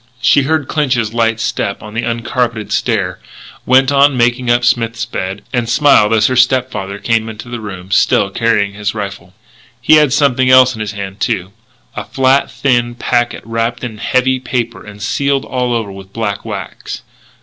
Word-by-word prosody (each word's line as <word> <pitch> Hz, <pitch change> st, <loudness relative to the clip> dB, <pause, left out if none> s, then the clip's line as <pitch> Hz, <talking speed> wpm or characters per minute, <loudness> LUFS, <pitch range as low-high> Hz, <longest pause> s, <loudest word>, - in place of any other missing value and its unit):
She 125 Hz, +4 st, +4 dB
heard 150 Hz, 0 st, 0 dB
Clinch's 125 Hz, -8 st, 0 dB
light 115 Hz, -1 st, +1 dB
step 100 Hz, -3 st, -2 dB
on 105 Hz, 0 st, -10 dB
the 115 Hz, -, -1 dB
uncarpeted 115 Hz, -1 st, -2 dB
stair; -, -, -1 dB, 0.5 s
went 130 Hz, +2 st, +4 dB
on 140 Hz, -1 st, +4 dB
making 120 Hz, +1 st, +1 dB
up 120 Hz, 0 st, +3 dB
Smith's 115 Hz, -1 st, 0 dB
bed; 95 Hz, -4 st, -5 dB
and 120 Hz, -2 st, -1 dB
smiled 120 Hz, -6 st, +4 dB
as 110 Hz, -1 st, +3 dB
her 130 Hz, -, +1 dB
step 130 Hz, 0 st, +3 dB
father 100 Hz, 0 st, -5 dB
came 115 Hz, +1 st, 0 dB
into 110 Hz, +2 st, -9 dB
the 120 Hz, -1 st, -5 dB
room, 95 Hz, -3 st, -8 dB
still 100 Hz, 0 st, +3 dB
carrying 105 Hz, -2 st, +1 dB
his 105 Hz, +1 st, -3 dB
rifle. 100 Hz, -3 st, -6 dB, 0.4 s
He 155 Hz, -, +5 dB
had 150 Hz, -3 st, +4 dB
something 130 Hz, -3 st, +2 dB
else 130 Hz, 0 st, +6 dB
in 110 Hz, -, -7 dB
his 105 Hz, 0 st, -4 dB
hand, 100 Hz, -1 st, -7 dB
too, 95 Hz, 0 st, -2 dB, 0.4 s
a -, -, -4 dB
flat, 135 Hz, +1 st, +2 dB
thin 120 Hz, -3 st, 0 dB
packet 120 Hz, 0 st, -1 dB
wrapped 115 Hz, +1 st, -2 dB
in 110 Hz, -3 st, -6 dB
heavy 130 Hz, +2 st, +1 dB
paper 120 Hz, -2 st, -3 dB
and 105 Hz, -1 st, -10 dB
sealed 140 Hz, +5 st, 0 dB
all 125 Hz, -1 st, -2 dB
over 115 Hz, -4 st, -2 dB
with 95 Hz, 0 st, -12 dB
black 105 Hz, -3 st, -3 dB
wax. -, -, -7 dB
115 Hz, 180 wpm, -15 LUFS, 105-130 Hz, 0.5 s, else